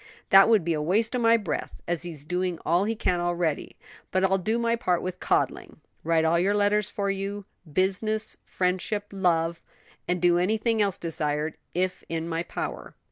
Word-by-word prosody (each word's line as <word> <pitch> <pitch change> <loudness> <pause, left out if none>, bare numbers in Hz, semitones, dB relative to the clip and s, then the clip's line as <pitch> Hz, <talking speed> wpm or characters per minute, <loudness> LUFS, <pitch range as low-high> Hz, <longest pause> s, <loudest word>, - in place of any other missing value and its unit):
"That 195 +2 +8
would 220 -6 +4
be 170 0 0
a 155 - -1
waste 210 +9 +1
of 230 -3 +3
breath, 165 - -3
as 175 -2 0
he's 165 -5 -5
doing 180 +2 -2
all 175 +4 +2
he 225 +2 -1
can 180 -4 0
already; 175 -3 -1 0.3
but 185 0 0
I'll 190 0 +3
do 220 +5 0
my 235 0 +1
part 180 -7 0
with 185 0 -4
coddling, - - -1 0.2
write 160 0 +2
all 165 +1 +3
your 195 +4 +2
letters 205 0 +2
for 200 -1 -1
you 195 +1 -4 0.3
business, 215 +5 0
friendship, 185 +3 -1
love 170 -3 0 0.5
and 180 0 0
do 175 0 +4
anything 220 +4 +1
else 200 -2 +1
desired; 150 -2 -2 0.2
if 185 +1 -1
in 165 0 -3
my 165 0 -1
power." 175 - -6
185 Hz, 180 wpm, -26 LUFS, 170-205 Hz, 0.5 s, That